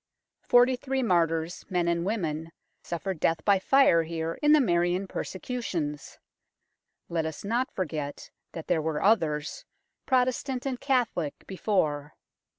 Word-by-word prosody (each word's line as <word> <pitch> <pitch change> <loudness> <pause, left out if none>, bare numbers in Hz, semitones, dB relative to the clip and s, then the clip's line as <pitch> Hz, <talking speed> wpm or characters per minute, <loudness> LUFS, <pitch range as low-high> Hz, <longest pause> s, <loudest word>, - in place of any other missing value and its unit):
Forty 245 +1 +5
three 265 +1 -2
martyrs, 165 -4 +1
men 180 -2 0
and 170 0 +1
women, 165 -6 -2 0.3
suffered 175 0 -4
death 165 0 0
by 200 -2 +4
fire 270 -6 +5
here 165 0 -4
in 295 0 +4
the 305 - +7
Marian 175 -4 +1
persecutions. 180 - -4 0.9
Let 165 -1 -1
us 160 - -7
not 240 +5 0
forget 150 -5 -5 0.2
that 165 - -6
there 170 -3 +1
were 155 -1 -2
others, 165 - +1 0.4
Pro 255 -2 +4
testant 255 0 -3
and 260 -2 -3
Catholic, 240 - -1
before. 155 -7 -1
175 Hz, 135 wpm, -27 LUFS, 160-245 Hz, 0.9 s, the